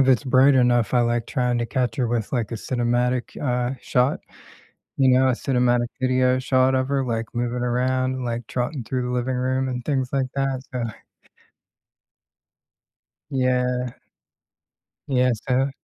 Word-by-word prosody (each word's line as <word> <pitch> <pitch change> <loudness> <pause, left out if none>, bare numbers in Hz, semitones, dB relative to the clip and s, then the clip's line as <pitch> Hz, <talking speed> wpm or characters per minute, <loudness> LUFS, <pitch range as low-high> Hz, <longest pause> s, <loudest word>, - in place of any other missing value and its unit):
if 135 - +3
it's 130 +1 +4
bright 130 +1 +5
enough, 120 -3 +3
I 125 - +5
like 120 -1 0
trying 125 -4 0
to 120 - -1
catch 125 -3 -1
her 125 - +1
with, 115 -2 -2
like, 120 -3 -1
a 115 - -2
cinematic, 120 +1 -1
uh, 125 -1 0
shot. 125 +3 +1 0.8
You 135 -1 +4
know? 130 0 +4
A - - +4
cinematic 120 -1 +1
video 130 0 +2
shot 130 0 +2
of 130 0 0
her, 140 -1 +1
like, 115 -2 -2
moving 120 +1 -2
around, 130 +1 0
like, 120 -1 -3
trotting 125 +2 -3
through 125 +2 -2
the - - -3
living 125 +1 -1
room, 130 +1 0
and 125 -1 -4
things 130 -4 0
like 135 -1 +1
that, 135 -1 -1
so 125 - -2 2.5
Yeah. 125 -2 0 1.1
Yeah, 125 -2 +2 0.2
so 130 +1 +2
125 Hz, 155 wpm, -23 LUFS, 120-130 Hz, 2.5 s, bright